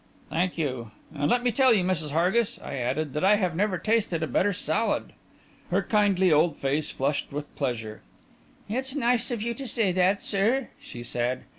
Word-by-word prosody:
"Thank 175 +3 0
you. 130 -8 -2 0.2
And 145 0 -1
let 245 +4 +2
me 245 - +2
tell 260 +2 +4
you, 190 - +2
Mrs. 170 -5 0
Hargis," 180 +9 +1
I - - -6
added, 135 +4 -2
"that 150 - -2
I 200 +2 +6
have 185 -5 -1
never 195 +1 +1
tasted 205 -6 0
a - - -1
better 205 +6 +2
salad." 210 +4 -1 0.6
Her - - +1
kindly 195 -5 +3
old 155 +1 +3
face 145 +3 -1
flushed 140 +2 -2
with 145 +1 -6
pleasure. 110 -3 -3 0.7
"It's 260 +5 -2
nice 245 -3 +1
of 235 -4 -3
you 235 +1 -1
to 265 +3 -7
say 220 -4 +1
that, 185 +2 +2
sir," 225 +6 +1
she 120 - -9
said. 120 +1 -2
185 Hz, 185 wpm, -26 LUFS, 150-220 Hz, 0.7 s, I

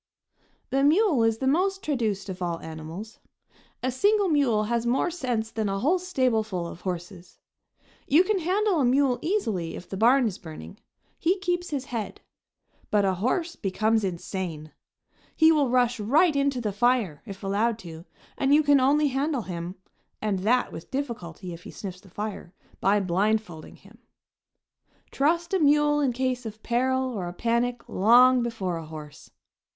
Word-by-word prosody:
The 270 +1 +2
mule 310 - +4
is 225 -1 +2
the 265 - -3
most 380 +8 +1
traduced 225 -9 -1
of 185 -1 -7
all 170 -2 -2
animals. 160 +7 -8 0.6
A 255 - +1
single 405 - +2
mule 265 -9 +2
has 230 +2 -1
more 250 +8 +1
sense 245 -9 -2
than 215 -2 -2
a 195 - -1
whole 310 - +2
stableful 225 - 0
of 170 - -10
horses. 180 0 -6 0.7
You 310 +6 +5
can 390 +1 0
handle 375 +1 +1
a - - +2
mule 255 0 +2
easily 220 - -1
if 175 - -9
the 195 - -6
barn 245 +5 +4
is 210 -2 -3
burning; 165 +3 -10 0.4
he 360 +4 +2
keeps 355 -2 -2
his 275 -3 -3
head; 235 -6 -5 0.7
but 205 -1 +2
a 190 - +2
horse 320 - -1
becomes 215 +3 0
insane. 170 -4 -4 0.6
He 320 0 +6
will 295 -5 +2
rush 245 -1 +2
right 290 - +3
into 280 -2 +1
the 210 -3 -2
fire, 225 - +1
if 195 0 -9
allowed 210 +4 0
to, 165 0 -9 0.3
and 275 +1 +4
you 310 - +4
can 290 -1 +5
only 290 +3 +3
handle 275 -1 -1
him, 175 0 -6 0.4
and 210 -3 -1
that 235 +6 +1
with 165 - -9
difficulty 200 - -5
if 170 - -10
he - - -11
sniffs 185 -2 -8
the 190 - -18
fire, 205 -2 -6 0.2
by 200 +2 +3
blindfolding 195 -2 -1
him. 215 +4 -19 1.1
Trust 335 +5 0
a 380 - +3
mule 295 -1 +4
in 280 -3 +2
case 255 0 -2
of 220 0 -10
peril 260 +2 +1
or 190 -5 -4
a 175 - -6
panic 235 +4 -1
long 245 +5 +5
before 205 -7 -3
a 165 - -7
horse. 155 -2 -10
235 Hz, 165 wpm, -26 LUFS, 195-280 Hz, 1.1 s, He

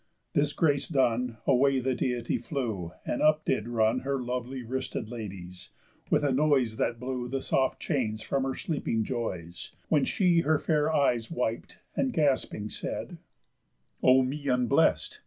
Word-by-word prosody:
This 145 0 +2
grace 145 -3 +1
done, 125 -5 +1
Away 135 +1 +4
the 130 +1 0
Deity 120 -2 -1
flew; 110 - -3
and - - -2
up 155 0 +3
did 115 -4 0
run 115 +1 +2
Her 135 +1 -2
lovely 125 +1 -4
wristed 130 -2 -4
ladies, 95 -6 -8 0.4
with - - +3
a 145 - +2
noise 130 -5 +2
That 115 - -1
blew 125 -1 -3
the 135 +1 -1
soft 130 0 0
chains 110 -8 -1
from 135 - 0
her 135 -1 -2
sleeping 115 -8 -1
joys; 90 -8 -5 0.2
When 150 -4 +3
she 180 -3 +3
her 160 -1 +3
fair 150 0 +1
eyes 125 -7 +2
wip'd, 120 -7 -3 0.2
and, 265 - +1
gasping, 135 - 0
said: - - -5 0.8
"O 130 +1 +6
me 140 +3 -4
unblest! 125 -3 +2
130 Hz, 155 wpm, -28 LUFS, 115-140 Hz, 0.8 s, O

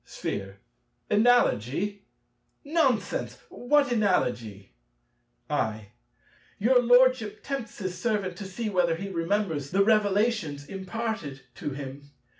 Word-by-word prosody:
Sphere. 95 0 -5 0.5
Analogy! 205 - +2 0.6
Nonsense: 280 -9 0
what 280 +2 +2
analogy? 120 - 0 0.7
I. 110 -2 -2 0.7
Your 245 +4 +4
Lordship 245 -3 +4
tempts 270 -6 -5
his 185 -3 -4
servant 200 -4 -1
to 205 - -6
see 205 +4 -4
whether 180 -5 +2
he 195 +4 -6
remembers 170 -5 -1
the 195 +4 +3
revelations 205 -8 +1
imparted 190 -6 -5
to 145 - -5
him. 140 +1 -8
200 Hz, 100 wpm, -27 LUFS, 145-230 Hz, 0.7 s, Your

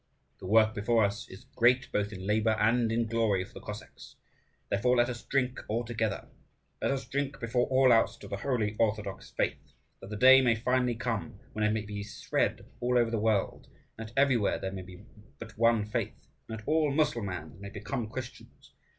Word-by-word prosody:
The 95 - -8
work 110 +2 +5
before 115 +1 +2
us 100 +2 -4
is 95 - -12
great 125 +2 +3
both 105 0 -1
in 95 -2 -7
labour 110 +2 +2
and 115 +1 +2
in 115 +1 +1
glory 110 -5 +1
for - - -19
the - - -9
Cossacks. 105 +1 -10 0.5
Therefore 125 +5 +2
let 120 +1 +3
us 120 -1 -5
drink 130 -2 -1
all 115 +3 -1
together, 110 -3 -2 0.5
let - - +1
us 135 -1 -1
drink 135 +2 -3
before 120 +1 0
all 130 -1 +5
else 115 - +3
to - - -11
the 100 - -4
holy 110 -3 -1
orthodox 105 -3 -1
faith, - - -3 0.3
that 95 - -11
the 105 - -5
day 130 +4 +8
may 120 -3 +3
finally 125 +1 +1
come 110 -6 -3
when 110 - -2
it 105 - +3
may 110 0 -1
be 105 0 -5
spread 105 -1 -2 0.2
over 125 +1 +2
all 115 - -5
the 115 - 0
world, 105 -2 0 0.3
and 110 0 -7
that - - -19
everywhere 135 -7 +3
there 95 - -4
may 95 -1 -6
be 95 +2 -12 0.3
but 115 -1 -10
one 115 -1 +3
faith, 105 - -4 0.2
and 110 - -4
that 110 - -13
all 155 -1 +2
Mussulmans 100 - -1
may 100 - -7
become 110 +3 -4
Christians. 125 +2 -9
115 Hz, 200 wpm, -30 LUFS, 105-125 Hz, 0.5 s, day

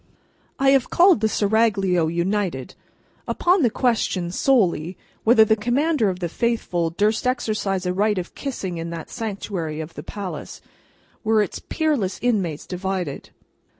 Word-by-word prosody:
I 270 0 +3
have 270 -3 +3
called 355 - +5
the 220 - +2
Seraglio, 200 -6 +2
united. 170 -4 -1 0.5
Upon 360 +1 +2
the 245 - +4
question, 215 -8 0
solely, 185 - +1 0.3
whether 220 -1 +6
the 220 - +3
Commander 245 +2 +1
of 185 -1 -5
the 175 - 0
Faithful 180 -5 -1
durst 210 +8 0
exercise 215 -6 -1
a 180 - 0
right 205 +2 +1
of 175 -1 -4
kissing 190 - -4
in 165 +1 -4
that 165 -2 -7
sanctuary 195 -7 -4
of 160 +1 -6
the - - -7
palace, 200 -3 -7 0.6
were 215 -1 +3
its 195 - -6
peerless 295 - -1
inmates 195 -11 -1
divided. 180 -5 -4
205 Hz, 145 wpm, -22 LUFS, 175-230 Hz, 0.6 s, whether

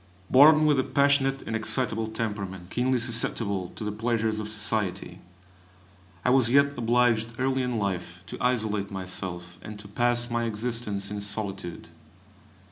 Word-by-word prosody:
Born 155 +3 +7
with 150 -3 +3
a - - +2
passionate 135 0 +2
and 110 - -4
excitable 110 0 0
temperament, 100 -5 -5
keenly 130 +1 +1
susceptible 110 -5 0
to - - -6
the 105 - -2
pleasures 110 0 -1
of 105 - -4
society, 105 -4 -2 1.0
I 125 - +4
was 130 -3 +4
yet 140 +2 +4
obliged 120 -1 +2
early 130 0 0
in 125 -2 -1
life 90 -3 -3
to - - -8
isolate 110 -5 0
myself, 90 -2 -6
and 105 -1 -8
to 105 0 -11
pass 120 +3 0
my 120 0 0
existence 110 -3 -3
in 105 -1 -4
solitude. 100 -4 -5
110 Hz, 145 wpm, -26 LUFS, 100-125 Hz, 1.0 s, Born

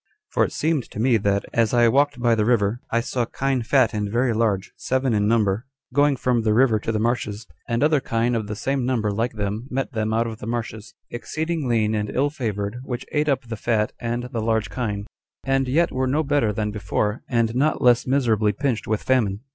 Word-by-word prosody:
For - - +2
it - - -1
seemed 155 -5 -1
to - - -8
me 120 0 +3
that, 100 -1 0
as 115 0 +2
I 120 -1 +5
walked 140 +3 +2
by 120 -1 +3
the 110 -2 +2
river, 115 0 +1
I 115 - +1
saw 120 0 -1
kine 135 +2 -1
fat 130 +3 +3
and 105 -1 -2
very 120 +1 +1
large, 105 -4 0
seven 130 -1 0
in 105 -1 +2
number, 110 0 +1 0.3
going 145 0 +4
from 125 -2 +1
the 110 -1 +1
river 120 -3 +4
to 115 - -3
the 110 - -1
marshes; 110 -1 -1 0.2
and 115 +3 +1
other 150 -1 +4
kine 115 -1 0
of 110 -3 -1
the 105 - -4
same 135 +4 -1
number 120 -5 0
like 115 +4 -1
them, 105 +3 -3
met 135 +1 -2
them 110 -1 -1
out 115 +1 +1
of 115 -1 -6
the - - -7
marshes, 115 -1 -5 0.2
exceeding 160 +4 -3
lean 110 -2 +1
and 105 -1 -1
ill 140 +5 0
favored, 105 -5 -3
which 130 -1 -5
ate 150 0 +1
up 135 -2 +1
the 115 - -4
fat 105 0 0
and 120 0 -2
the 115 - -1
large 110 -1 0
kine, 105 -5 -3 0.4
and 135 0 +1
yet 160 +7 +2
were 130 0 -1
no 150 +5 +1
better 145 -7 +1
than 105 0 -2
before, 105 +2 -2
and 115 -2 +1
not 145 +4 +2
less 125 0 +4
miserably 115 -6 +2
pinched 125 0 -2
with 110 -1 -1
famine. 110 -6 +1
115 Hz, 220 wpm, -23 LUFS, 110-130 Hz, 0.4 s, I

